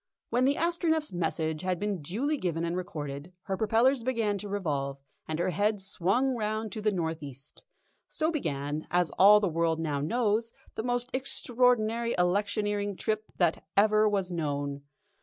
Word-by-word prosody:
When 245 +2 +3
the 280 +2 +3
Astronef's 325 - +1
message 160 -2 -1
had 185 -1 -1
been 205 -3 -2
duly 260 - -1
given 170 -2 -1
and 170 +1 -2
recorded, 150 -2 -5
her 195 - -2
propellers 230 +6 +3
began 225 -5 0
to 205 - -5
revolve, 145 -9 -2 0.3
and 155 - -2
her 175 +2 0
head 205 +2 +1
swung 195 +8 +1
round 215 -1 -2
to 215 - -5
the 215 0 +2
north 165 -4 -2
east. 140 0 -9 0.5
So 315 +1 0
began, 150 - -3
as 175 -3 +2
all 205 +2 +9
the 205 - +1
world 165 -1 0
now 150 -3 -1
knows, 225 +6 0 0.2
the - - -3
most 245 +1 -1
extraordinary 235 -3 +1
electioneering 205 +2 0
trip 215 +2 -2
that 170 -3 +1
ever 215 +1 +5
was 195 -3 -1
known. 145 -4 -2
205 Hz, 160 wpm, -29 LUFS, 165-230 Hz, 0.5 s, all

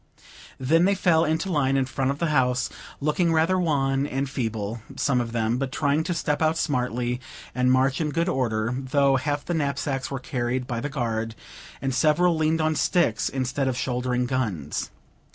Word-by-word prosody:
Then 160 +7 +3
they 200 +1 +3
fell 170 -4 +3
into 160 +4 -1
line 135 -4 +2
in 135 - +2
front 130 0 -1
of 140 - -1
the 165 0 0
house, 125 -2 +2 0.3
looking 155 +4 +1
rather 165 +3 +3
wan 140 -4 +1
and 135 +1 -2
feeble, 115 -4 -3
some 130 -3 +1
of 115 -1 -4
them, 115 +1 0
but 135 -1 -2
trying 150 +1 +1
to 175 - -1
step 150 -2 -1
out 160 +1 +2
smartly 125 -4 -1 0.3
and 125 0 +2
march 130 +3 +2
in 155 - 0
good 165 +3 0
order, 115 -3 0
though 135 +1 +2
half 145 +2 -2
the 175 - -2
knapsacks 140 -3 -1
were 135 - -3
carried 125 -1 -2
by 120 -2 -3
the 145 - -3
guard, 115 -4 -2 0.5
and 135 -1 0
several 160 +6 +3
leaned 160 0 +1
on 155 0 +2
sticks 165 - +1
instead 135 +1 -1
of 130 -2 -1
shouldering 125 -1 -1
guns. 105 - -2
135 Hz, 185 wpm, -25 LUFS, 125-155 Hz, 0.5 s, Then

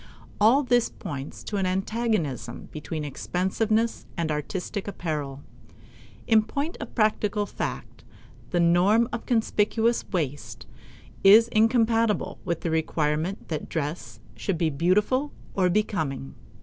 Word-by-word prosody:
All 235 +7 +5
this 245 -2 +2
points 145 -7 -7
to 205 - -3
an 190 -1 +1
antagonism 185 - -2
between 155 0 -5
expensiveness 210 - -1
and 165 -2 -1
artistic 180 +7 -3
apparel. 150 -7 -4 0.8
In 220 -1 +5
point 280 +9 -3
of - - -8
practical 215 -2 +1
fact, - - -5 0.5
the 175 - 0
norm 180 +7 +4
of 235 - -5
conspicuous 225 0 +1
waste 145 -7 -3 0.6
is 220 +4 +8
incompatible 225 -1 +2
with 170 -3 -2
the 165 - -2
requirement 160 +2 -1
that 155 -2 -4
dress 145 -8 -4 0.2
should 120 - -2
be 160 -1 +1
beautiful 210 - +1 0.2
or 185 -2 +2
becoming. 160 -9 -1
190 Hz, 120 wpm, -26 LUFS, 155-225 Hz, 0.8 s, is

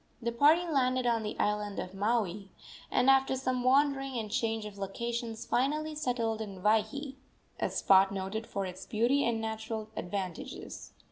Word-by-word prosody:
The 235 -1 -2
party 300 +8 +5
landed 255 -5 +1
on 230 -2 +2
the 210 0 -4
island 210 -1 -1
of 185 - -4
Maui, 200 -2 -1 0.4
and, 250 - +2
after 270 0 +5
some 255 -1 -1
wandering 270 0 +2
and 215 -2 -4
change 225 -1 -1
of 205 -1 -9
locations, 235 +3 -4
finally 300 +5 0
settled 240 -7 -1
in 195 -4 -7
Waihee, 225 +7 +1 0.4
a - - 0
spot 195 0 +4
noted 195 +3 -4
for 200 -1 -3
its 185 +1 -8
beauty 240 +6 +2
and 235 -1 +1
natural 220 0 -4
advantages. 185 -2 -5
225 Hz, 155 wpm, -31 LUFS, 205-260 Hz, 0.4 s, party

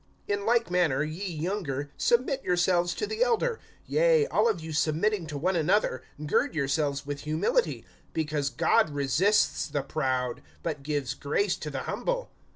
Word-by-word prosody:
(5)In 205 0 -1
like 230 -4 +2
manner, 160 -6 +2
ye 155 +5 -5
younger, 155 -4 -3
submit 255 +3 +2
yourselves 175 0 +2
to - - -1
the 440 +2 -4
elder. 480 -1 +1 0.3
Yea, 485 -2 +4
all 220 +2 +3
of 215 - 0
you 160 0 -6
submitting 165 +5 +1
to 150 -2 -5
one 180 +6 0
another, 170 -3 +2 0.2
gird 150 - +1
yourselves 140 0 0
with 145 0 -4
humility; 160 - 0 0.3
because, 150 -3 -1
God 130 +4 +3
resists 150 - +2
the 145 - -2
proud, 130 -4 -1 0.2
but 155 -4 -3
gives 145 -2 -2
grace 175 +7 0
to 150 - -5
the 140 - -4
humble. - - -2
160 Hz, 160 wpm, -28 LUFS, 145-210 Hz, 0.3 s, Yea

